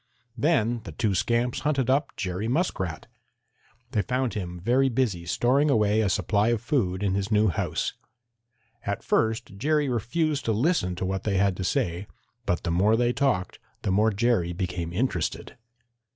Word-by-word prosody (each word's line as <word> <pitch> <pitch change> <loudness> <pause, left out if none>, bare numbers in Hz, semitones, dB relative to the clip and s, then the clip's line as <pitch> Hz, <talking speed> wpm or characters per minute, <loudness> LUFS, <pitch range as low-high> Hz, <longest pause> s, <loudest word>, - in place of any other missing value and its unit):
Then 120 -4 +1
the - - -8
two 105 -3 0
scamps 120 +5 0
hunted 140 -4 0
up 140 +2 +1
Jerry 95 +2 -2
Muskrat. 115 - -1 0.9
They 110 -6 +1
found 130 +2 -1
him 90 -4 -5
very 125 +8 +2
busy 110 -9 -1
storing 135 - +2
away 110 -3 +3
a 105 - +1
supply 100 +2 +1
of 120 -1 +2
food 105 - -1
in 100 -2 +1
his 100 +1 -1
new 105 0 +4
house. 85 - -2 0.9
At 100 +2 -3
first 110 -3 0
Jerry 150 +5 +1
refused 145 +6 0
to 115 - +1
listen 110 - +1
to 90 - -3
what 95 0 -2
they 100 -3 0
had 100 -1 +2
to 95 - -3
say, 90 +1 -1 0.4
but 90 - 0
the 85 - -1
more 100 +6 +3
they 120 0 +2
talked 125 -9 0 0.2
the 95 - 0
more 105 +3 +3
Jerry 105 -5 +1
became 85 -2 -3
interested. 90 -4 -2
110 Hz, 165 wpm, -26 LUFS, 95-125 Hz, 0.9 s, new